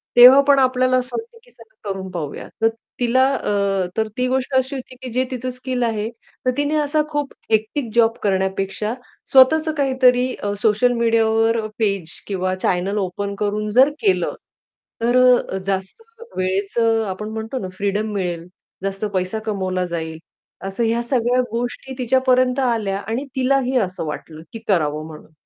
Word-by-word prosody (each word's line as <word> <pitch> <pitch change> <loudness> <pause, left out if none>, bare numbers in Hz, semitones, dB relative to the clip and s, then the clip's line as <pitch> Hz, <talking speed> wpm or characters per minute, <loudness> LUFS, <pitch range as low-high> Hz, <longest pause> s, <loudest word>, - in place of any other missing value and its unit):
तेव्हा 255 +3 +10
पण 280 -1 +6
आपल्याला 255 0 +3
असं 250 0 -3
वाटतं 460 +1 -8
की - - -22
चला 445 - -12
करून 190 -1 -4
पाहूया 160 -5 -5
तर 225 - +5 0.3
तिला 250 +1 +3
अ, 200 -4 0
तर 220 0 +1
ती 250 0 +1
गोष्ट 260 +1 -1
अशी 260 +2 +1
होती, 255 -1 -8
की 255 - -6
जे 255 +1 +2
तिचं 255 0 -3
स्किल 250 0 -3
आहे 220 -2 -1 0.4
तर 255 - +3
तिने 290 +1 0
असा 300 +1 +1
खूप 290 -2 -3 0.2
हेक्टिक 220 +4 0
जॉब 230 -1 +4
करण्यापेक्षा 195 +2 -1 0.4
स्वतःच 310 +5 +6
काहीतरी 255 -2 +3
अ, 205 0 -3
सोशल 225 +3 +3
मीडियावर 225 0 +3 0.2
पेज 195 -6 -1
किंवा 185 -2 -1
चॅनेल 185 +2 -1
ओपन 200 +1 -3
करून 210 +1 -1
जर 255 +6 +5
केलं. 395 -3 +1 0.7
तर 240 +2 +3 0.3
अ, 190 - -2
जास्त 190 - -3 0.4
वेळेचं 200 +5 +1
आपण 210 +3 -5
म्हणतो 220 +3 -5
ना 190 - -4
फ्रीडम 205 +2 -1
मिळेल, 175 -3 -3 0.4
जास्त 195 +1 -2
पैसा 185 +3 -1
कमावला 185 -4 -1
जाईल. 160 -2 -4 0.5
असं 195 +4 -2
ह्या 230 +1 +1
सगळ्या 245 0 +1
गोष्टी 245 +3 -4
तिच्यापर्यंत 255 0 +2
आल्या 225 -6 0
आणि 225 +7 -3
तिलाही 260 0 +1
असं 185 -7 -1
वाटलं, 155 +1 -7
की 225 - -6
करावं 155 -5 +1
म्हणून. 155 0 -12
225 Hz, 160 wpm, -21 LUFS, 195-255 Hz, 0.7 s, तेव्हा